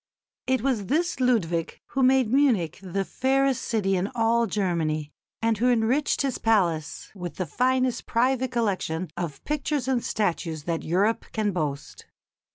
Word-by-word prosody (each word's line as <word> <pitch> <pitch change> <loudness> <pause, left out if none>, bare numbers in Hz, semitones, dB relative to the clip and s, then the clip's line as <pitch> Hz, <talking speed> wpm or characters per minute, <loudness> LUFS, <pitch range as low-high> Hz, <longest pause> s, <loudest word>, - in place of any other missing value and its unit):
It 260 -2 +2
was 240 -8 0
this 320 +3 0
Ludwig 180 -10 0
who 270 - -1
made 260 -2 +4
Munich 240 - +2
the 195 +1 -2
fairest 270 +2 +1
city 195 -4 0
in 185 +2 -1
all 230 0 +2
Germany, 165 -7 -1 0.3
and 225 -2 +1
who 250 +2 +3
enriched 245 +6 +2
his 270 -3 -1
palace 175 -9 0
with 180 -4 -7
the 185 - -2
finest 255 - 0
private 255 +2 +1
collection 185 -8 -1
of 160 -6 -5
pictures 295 -3 -2
and 255 -3 +1
statues 165 -6 -1
that 165 0 -2
Europe 200 +7 +1
can 215 -2 0
boast. 150 -5 -4
220 Hz, 150 wpm, -26 LUFS, 175-255 Hz, 0.3 s, made